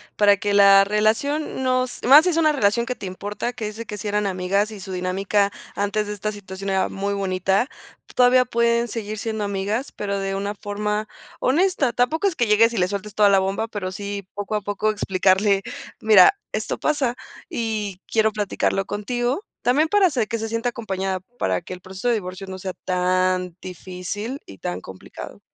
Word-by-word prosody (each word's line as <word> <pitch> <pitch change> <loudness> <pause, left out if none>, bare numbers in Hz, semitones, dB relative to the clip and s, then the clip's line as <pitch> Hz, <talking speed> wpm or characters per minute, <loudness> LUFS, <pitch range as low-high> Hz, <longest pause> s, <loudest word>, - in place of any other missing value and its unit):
para 205 -1 +5
que 205 +1 -1
la 200 -1 +7
relación 225 +9 0
nos 255 -1 0
más 280 +5 +8
sí - - +3
es 335 - 0
una 315 -2 +4
relación 235 -4 +2
que 250 - -2
te 200 - -7
importa, 205 +5 -4
que 235 -3 -5
es 215 +2 -6
que 210 - -5
si 210 +1 -5
eran 205 0 0
amigas 195 +2 0
y 215 -2 -9
su 190 0 -8
dinámica 195 +2 0 0.2
antes 205 +1 0
de 210 - -4
esta 210 +1 -3
situación 195 -1 -7
era 190 -1 +1
muy 200 +1 -2
bonita, 190 +3 +1 0.5
todavía 250 0 +5
pueden 235 0 +1
seguir 215 -1 -5
siendo 220 -1 -3
amigas, 205 +6 -2
pero 200 -1 -3
de 195 0 -2
una 200 +1 -2
forma 210 +1 -3 0.3
honesta. 295 -3 +2
Tampoco 260 - +1
es 370 - -1
que 240 - +1
llegues 225 +2 +4
y - - -4
le 180 -1 +2
sueltes 200 +1 -5
toda 210 -1 +5
la 195 -1 +5
bomba, 195 +4 -1
pero 200 -4 -4
sí 200 0 -5
poco 205 +1 -4
a 210 - 0
poco 205 +2 0
explicarle: 195 0 +2 0.4
"Mira, 220 - +7
esto - - -2
pasa 275 -5 0 0.3
y 210 -5 -3
quiero 220 -1 +2
platicarlo 200 -2 -1
contigo", 240 - -2 0.2
también 285 +6 +3
para 410 +1 +4
hacer 250 -10 -1
que 230 - -1
se 225 - -3
sienta 230 +2 -1
acompañada, 195 -6 -3 0.2
para 95 -1 0
que - - -8
el 180 - -10
proceso 190 +5 -6
de 240 - +4
divorcio 190 -1 -6
no 190 0 -6
sea 185 0 -4
tan 185 -1 +1
difícil 185 - -6
y 95 - -13
tan 90 +1 -3
complicado. 95 0 -10
205 Hz, 195 wpm, -22 LUFS, 195-235 Hz, 0.5 s, más